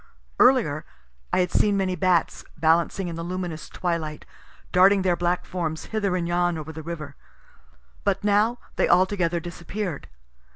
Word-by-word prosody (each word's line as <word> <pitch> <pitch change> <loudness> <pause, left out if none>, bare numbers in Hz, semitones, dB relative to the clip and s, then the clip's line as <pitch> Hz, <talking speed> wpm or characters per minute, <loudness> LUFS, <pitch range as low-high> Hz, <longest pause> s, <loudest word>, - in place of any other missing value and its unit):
Earlier - - +4 0.5
I - - +3
had 180 - -1
seen 205 -1 +3
many 190 -2 0
bats, 180 -2 +1
balancing 165 +4 +2
in 170 - -5
the - - -4
luminous 175 -2 -5
twilight, 165 -4 -3 0.5
darting 190 +1 +5
their 180 -2 +2
black 175 +1 -1
forms 160 -3 -3
hither 200 -4 0
and 175 -2 -1
yon 175 -1 +1
over 155 0 -6
the 160 - -7
river; 155 -3 -7 0.9
but 200 -1 0
now 210 +4 +3 0.2
they - - +2
altogether 175 -1 +3
disappear'd. 175 0 -5
175 Hz, 150 wpm, -25 LUFS, 165-190 Hz, 0.9 s, darting